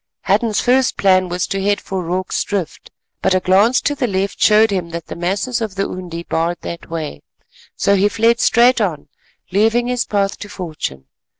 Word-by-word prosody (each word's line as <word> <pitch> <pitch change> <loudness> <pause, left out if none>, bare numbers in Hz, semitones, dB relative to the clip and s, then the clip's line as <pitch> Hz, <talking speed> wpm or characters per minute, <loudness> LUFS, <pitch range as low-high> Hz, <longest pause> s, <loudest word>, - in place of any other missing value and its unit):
Hadden's 210 +2 +1
first 255 0 +2
plan 185 -2 +3
was 180 +1 -1
to 195 - -3
head 205 +1 +1
for 190 -1 -4
Rorke's 180 +2 -2
Drift, 195 -6 -4 0.3
but 185 - +2
a - - +3
glance 200 +8 +3
to 290 - 0
the 270 -3 -1
left 195 -1 -2
showed 215 0 +5
him 180 -4 -2
that 170 -1 -6
the - - -8
masses 200 +8 -2
of 215 -4 -4
the 195 0 -1
Undi 175 -2 -6
barred 170 +1 -1
that 170 - -7
way, 155 - -5 0.5
so 200 - +2
he 200 +1 +3
fled 230 +2 +2
straight 240 0 +4
on, 165 -8 -2 0.4
leaving 225 +5 +2
his 245 0 -1
path 200 -1 -1
to 205 - -8
fortune. 155 - -6
195 Hz, 190 wpm, -18 LUFS, 180-220 Hz, 0.5 s, showed